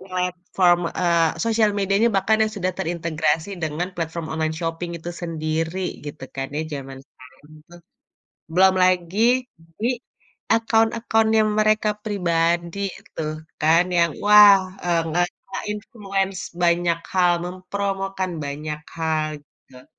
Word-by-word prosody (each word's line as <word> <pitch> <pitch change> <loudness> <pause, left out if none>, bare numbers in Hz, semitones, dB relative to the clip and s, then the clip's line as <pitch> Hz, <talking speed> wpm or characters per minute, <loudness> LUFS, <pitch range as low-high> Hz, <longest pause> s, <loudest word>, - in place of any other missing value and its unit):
platform, 180 -1 +1 0.2
eee, 170 -2 +2
sosial 225 -2 +3
medianya 200 +3 +2
bahkan 215 +3 +2
yang 215 0 0
sudah 185 -1 -1
terintegrasi 165 -2 -1 0.2
dengan 155 +4 -2
platform 165 -1 -4
online 160 0 -1
shopping 165 +1 -3
itu 170 +1 -7
sendiri 165 +1 -2 0.3
gitu 145 -2 -7
kan 135 0 -2
ya - - 0
jaman 135 -2 -6
sekarang 130 +4 -19 0.2
tuh. 175 0 -14 0.7
Belum 190 +2 +5
lagi, 180 +1 +1 0.6
di 230 - +2 0.7
akun-akunnya 225 -1 +2 0.2
mereka 215 0 +3
pribadi 170 -3 0 0.4
tuh 155 -1 -2 0.3
kan, 160 +3 +5
yang 170 -1 +3
wah, 210 -1 +9 0.3
eee, 170 -1 +2
ngerasain 175 +2 -3
influence 200 -3 -3 0.2
banyak 170 0 +2 0.2
hal, 180 -2 +4
mempromokan 195 0 -3
banyak 150 +2 -5 0.2
hal, 160 -1 0
gitu. 130 -2 -20
175 Hz, 115 wpm, -22 LUFS, 160-195 Hz, 0.7 s, wah